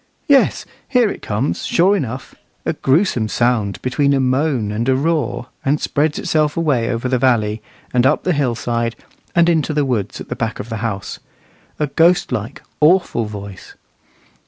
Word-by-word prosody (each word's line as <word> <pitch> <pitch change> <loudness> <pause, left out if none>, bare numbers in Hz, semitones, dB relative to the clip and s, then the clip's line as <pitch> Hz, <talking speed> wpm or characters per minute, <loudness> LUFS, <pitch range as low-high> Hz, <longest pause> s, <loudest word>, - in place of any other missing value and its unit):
Yes, 280 -2 +3 0.2
here 245 -5 +3
it - - -8
comes, 110 +7 -2
sure 190 +4 +3
enough, 130 - -4 0.3
a - - 0
gruesome 135 - +1
sound 115 -3 0
between 140 +3 +1
a - - +1
moan 130 -4 +1
and 115 +4 -1
a 130 - +4
roar, 150 -3 -1
and 145 +3 +1
spreads 150 +1 0
itself 155 -1 0
away 140 -9 +1
over 120 +1 -2
the 125 -1 +1
valley, 110 -4 +1 0.3
and 125 -1 +3
up 130 +4 +2
the 180 - +1
hillside, 120 -4 -1 0.4
and 170 0 +5
into 160 -3 +1
the 145 -1 +2
woods 110 -7 -2
at - - -8
the - - -4
back 115 -1 -3
of 110 - -6
the 110 - -3
house, 105 -3 -4 0.6
a 150 - +1
ghost 165 +4 +3
like, 125 +5 -4 0.2
awful 155 -7 +3
voice. 100 -2 -9
130 Hz, 170 wpm, -18 LUFS, 115-155 Hz, 0.6 s, and